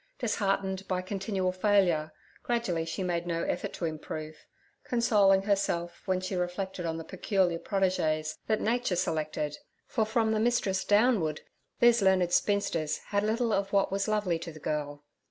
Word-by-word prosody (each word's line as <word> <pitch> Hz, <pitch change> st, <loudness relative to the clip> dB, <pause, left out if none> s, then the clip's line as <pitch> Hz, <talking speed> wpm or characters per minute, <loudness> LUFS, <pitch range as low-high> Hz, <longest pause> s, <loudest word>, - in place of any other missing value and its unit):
Disheartened 195 Hz, -4 st, -1 dB
by 185 Hz, -1 st, -1 dB
continual 190 Hz, -1 st, -1 dB
failure, 185 Hz, -5 st, +2 dB, 0.3 s
gradually 215 Hz, -9 st, -1 dB
she 165 Hz, +4 st, -3 dB
made 175 Hz, -1 st, -1 dB
no 170 Hz, -1 st, -1 dB
effort -, -, -2 dB
to 170 Hz, -, -3 dB
improve, 155 Hz, -1 st, -6 dB, 0.4 s
consoling 205 Hz, -5 st, +3 dB
herself 195 Hz, -4 st, -1 dB
when 185 Hz, -1 st, +1 dB
she 185 Hz, +1 st, -4 dB
reflected 180 Hz, 0 st, -3 dB
on 160 Hz, 0 st, -2 dB
the 165 Hz, -, -5 dB
peculiar 180 Hz, -1 st, 0 dB
protégés 160 Hz, -6 st, 0 dB
that 220 Hz, -1 st, +1 dB
Nature 235 Hz, -3 st, +1 dB
selected, 155 Hz, -3 st, -2 dB, 0.3 s
for 225 Hz, -, 0 dB
from 220 Hz, 0 st, +1 dB
the 220 Hz, -, +1 dB
mistress 215 Hz, -5 st, +1 dB
downward 205 Hz, -, +2 dB, 0.4 s
these 240 Hz, -1 st, +6 dB
learned 185 Hz, -2 st, +3 dB
spinsters 170 Hz, -7 st, +1 dB
had 200 Hz, 0 st, +1 dB
little 225 Hz, +2 st, 0 dB
of 195 Hz, 0 st, 0 dB
what 195 Hz, -1 st, +3 dB
was 195 Hz, +1 st, -1 dB
lovely 205 Hz, -6 st, 0 dB
to 165 Hz, 0 st, -7 dB
the 155 Hz, -, -12 dB
girl. 145 Hz, -1 st, -3 dB
190 Hz, 155 wpm, -29 LUFS, 170-205 Hz, 0.4 s, these